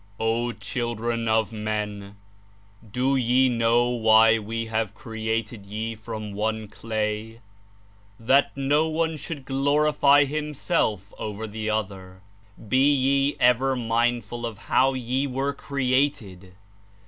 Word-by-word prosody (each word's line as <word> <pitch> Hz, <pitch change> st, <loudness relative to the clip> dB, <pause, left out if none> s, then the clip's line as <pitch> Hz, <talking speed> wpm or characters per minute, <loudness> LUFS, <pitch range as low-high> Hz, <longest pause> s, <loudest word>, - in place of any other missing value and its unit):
*^0 115 Hz, +1 st, -1 dB
Children 115 Hz, +1 st, -3 dB
of 110 Hz, 0 st, +1 dB
Men! 105 Hz, -2 st, -4 dB, 0.8 s
De 130 Hz, +4 st, +1 dB
ye 130 Hz, +1 st, +3 dB
know 120 Hz, 0 st, +2 dB
why 110 Hz, -1 st, +5 dB
We 115 Hz, +2 st, -4 dB
have 110 Hz, -2 st, -2 dB
created 110 Hz, -4 st, -4 dB
ye 110 Hz, +3 st, -4 dB
from 110 Hz, -1 st, -7 dB
one 110 Hz, +1 st, -2 dB
clay? 110 Hz, +1 st, -4 dB, 0.8 s
That 135 Hz, +5 st, +2 dB
no 145 Hz, +4 st, +2 dB
one 160 Hz, 0 st, -1 dB
should 150 Hz, -2 st, -7 dB
glorify 145 Hz, +1 st, +3 dB
himself 145 Hz, -, -2 dB
over 105 Hz, +1 st, -5 dB
the 110 Hz, 0 st, -4 dB
other? 95 Hz, -3 st, -4 dB, 0.5 s
Be 130 Hz, +6 st, +4 dB
ye 140 Hz, +1 st, +2 dB
ever 125 Hz, +2 st, +3 dB
mindful 120 Hz, 0 st, -1 dB
of 115 Hz, -3 st, -4 dB, 0.2 s
how 135 Hz, +1 st, +4 dB
ye 130 Hz, +2 st, -1 dB
were 135 Hz, +2 st, -2 dB
created. 130 Hz, -10 st, -2 dB
115 Hz, 115 wpm, -24 LUFS, 110-135 Hz, 0.8 s, why